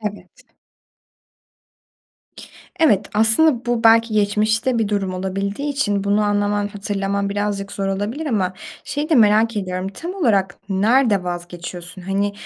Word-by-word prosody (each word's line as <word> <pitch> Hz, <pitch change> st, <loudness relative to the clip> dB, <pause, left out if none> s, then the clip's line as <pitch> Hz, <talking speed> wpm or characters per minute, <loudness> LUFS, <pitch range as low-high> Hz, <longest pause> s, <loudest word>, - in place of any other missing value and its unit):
Evet. 210 Hz, -1 st, -8 dB, 2.3 s
Evet, 210 Hz, -, +3 dB
aslında 235 Hz, +5 st, +3 dB
bu 240 Hz, -1 st, -1 dB
belki 225 Hz, 0 st, +5 dB
geçmişte 215 Hz, +4 st, +1 dB
bir 220 Hz, -, 0 dB
durum 195 Hz, -3 st, -1 dB
olabildiği 195 Hz, +8 st, -3 dB
için 205 Hz, -8 st, 0 dB
bunu 205 Hz, +1 st, +2 dB
anlaman, 205 Hz, 0 st, 0 dB
hatırlaman 200 Hz, -1 st, -2 dB
birazcık 200 Hz, -1 st, -3 dB
zor 195 Hz, -1 st, -3 dB
olabilir 210 Hz, +11 st, -3 dB
ama 195 Hz, -8 st, 0 dB, 0.3 s
şeyi 295 Hz, +2 st, -3 dB
de 320 Hz, -, +3 dB
merak 220 Hz, -1 st, +4 dB
ediyorum, 185 Hz, -1 st, -3 dB
tam 335 Hz, -, -7 dB
olarak 200 Hz, -, +1 dB
nerede 205 Hz, 0 st, +2 dB
vazgeçiyorsun? 175 Hz, 0 st, -7 dB
Hani, 200 Hz, +2 st, -1 dB
205 Hz, 125 wpm, -20 LUFS, 195-225 Hz, 2.3 s, belki